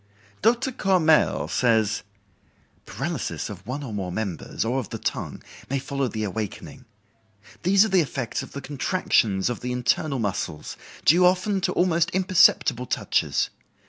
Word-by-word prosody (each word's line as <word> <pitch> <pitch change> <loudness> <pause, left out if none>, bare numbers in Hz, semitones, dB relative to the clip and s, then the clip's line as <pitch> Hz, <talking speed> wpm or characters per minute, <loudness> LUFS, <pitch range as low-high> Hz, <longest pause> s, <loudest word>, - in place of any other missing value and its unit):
Dr. 240 +4 +2
Courmelles 185 -9 +2
says: 110 -3 +2 0.9
"Paralysis - - -4
of 100 0 -11
one 135 +4 -4
or 120 -6 -6
more 95 -3 -3
members, 90 -5 -3
or 125 +4 0
of 120 - -6
the - - -5
tongue, - - -4 0.3
may 140 - 0
follow 135 0 -2
the 110 -2 -4
awakening. 110 +6 -5 0.8
These 195 +3 +5
are - - -2
the 190 -2 +4
effects 135 -5 -3
of - - -10
the 140 - -6
contractions 130 - +1
of 120 - -2
the 125 - -4
internal 130 +3 0
muscles, 95 -8 -3 0.3
due 175 +4 +6
often 185 +2 +2
to - - 0
almost 170 -2 +2
imperceptible 175 - +4
touches. - - 0
135 Hz, 145 wpm, -24 LUFS, 110-180 Hz, 0.9 s, due